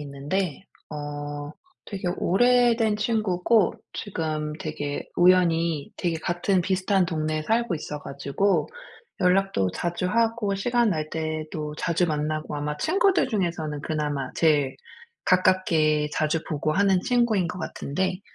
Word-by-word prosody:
있는데 150 +6 -3 0.3
어 145 0 -5 0.3
되게 190 -3 -4
오래된 235 +1 +3
친구고 215 -2 +2 0.2
지금 155 -5 -3
되게 145 -2 -4
우연히 170 -4 +3
되게 170 -2 -1
같은 175 +3 0
비슷한 190 +1 +1
동네에 155 -2 -1
살고 225 +1 +1
있어 150 -1 -6
가지고 140 +9 0 0.5
연락도 180 - +2
자주 175 +1 -2
하고 225 -1 +1
시간 240 +3 +1
날 155 -4 -2
때도 155 -1 -4
자주 170 +2 +1
만나고 155 -1 -2
아마 150 0 -3
친구들 380 - +2
중에서는 170 - -2
그나마 145 -4 -2
제일 145 -5 +2 0.5
가깝게 165 -5 +3
자주 155 +1 0
보고 155 0 -1
하는 195 +1 +3
친구인 235 -7 +2
것 180 - -6
같은데 185 +3 -3
170 Hz, 270 characters per minute, -25 LUFS, 150-195 Hz, 0.5 s, 오래된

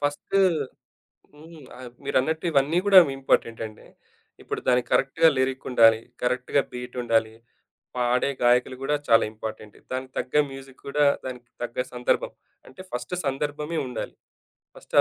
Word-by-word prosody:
First 145 +7 0 0.9
హ్మ్. 160 +1 -14 0.2
ఆహ్, 125 -1 -9
మీరన్నట్టు 160 +5 0
ఇవన్నీ 145 +4 +2
కూడా 195 -2 +9 0.2
ఇంపార్టెంటండి. 115 -4 -1 0.6
ఇప్పుడు - - -4
దాన్ని 125 0 +4
కరెక్ట్‌గా 160 +5 +4
లిరిక్కుండాలి, 130 -4 +3 0.2
కరెక్ట్‌గా 125 +2 +1
బీట్ 125 0 -7
ఉండాలి. 115 -2 +1 0.6
పాడే 125 +2 +1
గాయకులు 125 +1 +3
కూడా 150 +2 +1
చాలా 115 -1 +5
ఇంపార్టెంటు. 110 -1 -8
దానికి 130 0 -4
తగ్గ 125 - -5 0.2
మ్యూజిక్ 135 -1 -12
కూడా 145 +1 +1 0.2
దానికి 125 -2 -7
తగ్గ 120 0 -6 0.2
సందర్భం. 125 0 0 0.4
అంటే, 130 +8 -12
ఫస్టు 125 +8 -4
సందర్భమే 145 +4 -2
ఉండాలి. 125 -3 -6 0.6
ఫస్ట్ - - -15
130 Hz, 125 wpm, -25 LUFS, 120-145 Hz, 0.9 s, కూడా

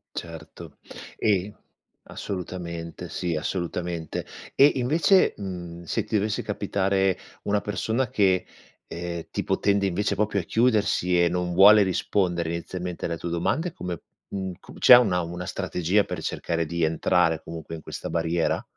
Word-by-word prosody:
Certo 85 -1 -9 0.4
e 100 0 0 0.5
assolutamente, 85 -3 -6
sì, 85 -3 -2
assolutamente. 85 0 -3 0.3
E 140 +2 +7
invece, 155 +9 +3
mhmm, 85 -3 -7
se 110 +6 -1
ti 110 +1 -2
dovesse 105 +1 0
capitare 95 -2 0 0.3
una 105 0 +1
persona 110 +5 -1
che, 95 -3 +2 0.4
ehm, 85 0 -5
tipo - - -1
tende 100 -1 +2
invece 100 +2 0
proprio 105 -1 +1
a - - -3
chiudersi 105 -5 +2
e 85 - +4
non 90 0 -2
vuole 100 +3 +8
rispondere 90 -2 0
inizialmente 90 +1 -5
alle 85 -1 -2
tue 85 - -5
domande 155 - -1
come 90 - -5 0.3
mhmm, 95 -1 -3
come - - -14
c'è 125 - +10
una 100 -8 +3
una 90 +2 -6
strategia 95 +1 0
per 90 -4 -6
cercare 85 +1 -2
di 85 +2 -3
entrare 80 0 +2
comunque 80 0 -7
in 80 - -9
questa - - -6
barriera? 85 0 0
90 Hz, 145 wpm, -25 LUFS, 85-100 Hz, 0.5 s, c'è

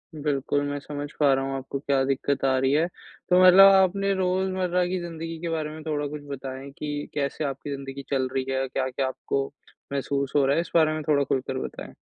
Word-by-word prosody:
बिल्कुल, 145 -1 0
मैं 145 0 -3
समझ 145 0 -6
पा 145 -2 +5
रहा 135 0 0
हूँ 135 0 -3
आपको 135 +1 -5
क्या 140 -1 +1
दिक्कत 135 0 0
आ 130 -1 +3
रही 130 +1 +2
है। 155 +3 +3 0.4
तो 180 0 +5
मतलब 185 +2 +9
आप 190 -1 +6
अपने 195 +1 -1
रोजमर्रा 185 -1 0
की 185 +1 -2
ज़िंदगी 165 -1 -6
के 170 - -3
बारे 160 -2 -2
में 155 0 -9
थोड़ा 150 -2 -2
कुछ 150 +1 -7
बताएँ 135 0 -6
कि 145 -1 -4
कैसे 145 +1 -2
आपकी 140 +1 -4
ज़िंदगी 135 0 -7
चल 130 -2 +1
रही 130 -1 -1
है, 135 0 0
क्या-क्या 130 0 -1
आपको 135 +1 -2 0.5
महसूस 140 0 -1
हो 140 -2 +4
रहा 140 +1 +3
है? 165 - +2
इस 170 - -9
बारे 155 -2 +5
में 155 - -3
थोड़ा 140 -2 +4
खुलकर 130 -1 -2
बताएँ। - - -6
145 Hz, 220 wpm, -25 LUFS, 135-165 Hz, 0.5 s, मतलब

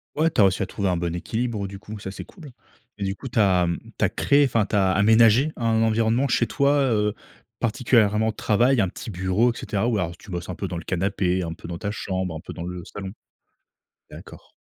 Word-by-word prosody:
Ouais 160 +2 +3
tu 110 - +1
as - - +7
réussi 95 0 +2
à 100 - -1
trouver 100 -2 -2
un 90 - 0
bon 85 0 -2
équilibre, 110 +1 -3
du 100 0 -9
coup, 105 +1 -9
ça, 95 -1 -7
c'est - - -8
cool, 155 -8 -13 0.5
mais - - -3
du 95 +1 -2
coup 130 - -8
tu 115 - -1
as, 90 -3 +4
mmh, 85 0 -2 0.2
tu - - +2
as - - +1
créé 145 0 +3
enfin 115 -4 +1
tu - - -2
as 95 -2 +3
aménagé 110 - +5
un 115 -2 +1
environnement 115 +4 +2
chez 120 -1 +2
toi, 140 +2 +2
heu, 105 -4 +1 0.4
particulièrement 110 -2 +2
travail, 120 +5 +2
un 95 -4 +2
petit - - -9
bureau 95 +6 +1
et - - -11
cetera? 105 +3 -2
Ou 115 -3 +1
alors 85 -2 -2
tu 105 - -16
bosses 90 -1 -5
un - - -4
peu - - -4
dans 85 - -5
le 85 - -6
canapé, 95 0 0
un 85 -1 -4
peu 85 - -11
dans 85 -1 -6
ta 100 - -3
chambre, 95 -4 -3
un - - -5
peu - - -9
dans 85 - -7
le 90 0 -6
salon? 95 -2 -7 1.0
D'accord. - - -13
105 Hz, 240 wpm, -24 LUFS, 95-115 Hz, 1.0 s, as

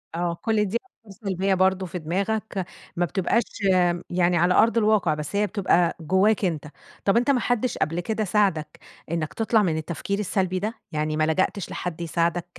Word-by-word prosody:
آه، 170 0 -1
كل 215 -2 +1
دي 210 +5 0
أفكار 230 - -19 0.2
سلبية 190 +1 +1
برضه 190 0 +2
في 180 0 -5
دماغك، 195 +3 -2 0.3
ما 175 +1 +1
بتبقاش 190 +8 +1 0.7
يعني 175 0 +2
على 175 +2 +3
أرض 230 +1 +4
الواقع، 210 -7 +3
بس 150 +5 -5
هي 210 +1 +2
بتبقى 180 -5 +1
جواك 190 +5 +2
أنت. 155 -4 -2 0.4
طب 195 +3 +4
أنت 245 +4 +3
ما 255 - +2
حدش 245 +1 0
قبل 165 +3 -1
كده 215 +4 -1
ساعدك 190 -6 0 0.3
إنك 160 -2 -2
تطلع 225 -1 +2
من 160 -4 0
التفكير 170 +5 -3
السلبي 185 -2 0
ده؟ 215 +4 -2 0.2
يعني 155 0 -1
ما 155 - +2
لجأتش 185 +4 0
لحد 175 -1 -5
يساعدك، 170 +1 0
185 Hz, 175 wpm, -24 LUFS, 170-210 Hz, 0.7 s, أرض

